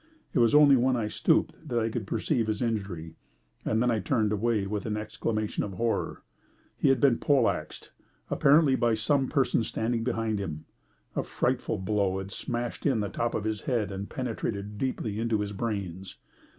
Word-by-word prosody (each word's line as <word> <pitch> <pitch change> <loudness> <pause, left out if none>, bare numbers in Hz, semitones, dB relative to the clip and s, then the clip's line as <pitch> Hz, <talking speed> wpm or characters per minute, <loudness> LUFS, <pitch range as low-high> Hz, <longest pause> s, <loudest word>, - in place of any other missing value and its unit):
It - - +2
was 120 +3 +4
only 145 -2 +8
when 130 +1 +3
I 115 -3 -1
stooped - - +2 0.2
that 120 - 0
I 115 -1 +1
could 110 -3 -4
perceive 120 -2 0
his 110 -1 -1
injury, 95 -8 -3 0.5
and 110 +2 +1
then 125 - +3
I 110 - +1
turned 110 +1 +1
away 105 -1 +1
with 105 +2 -3
an 105 -1 -1
exclamation 110 0 -2
of 100 - -5
horror. 115 +4 -2 0.5
He - - +2
had 135 - +4
been 135 -5 +4
pole 135 -5 +3
axed; - - -4 0.4
apparently 145 -1 +4
by 120 -3 +2
some 135 +4 +1
person 130 -4 +2
standing 115 +1 -1
behind 115 -3 -1
him. 80 -5 -5 0.5
A - - +1
frightful - - -1
blow 95 0 0
had 95 +1 -6
smashed 120 +5 -3
in 135 -6 +2
the 100 -1 -1
top 115 +4 -2
of 105 - -1
his 110 -2 -2
head 110 -6 0
and 100 +1 -5
penetrated 105 -5 -4
deeply 110 -5 -2
into 115 -1 +1
his 105 -1 -2
brains. 95 -4 -4
110 Hz, 185 wpm, -28 LUFS, 100-120 Hz, 0.5 s, only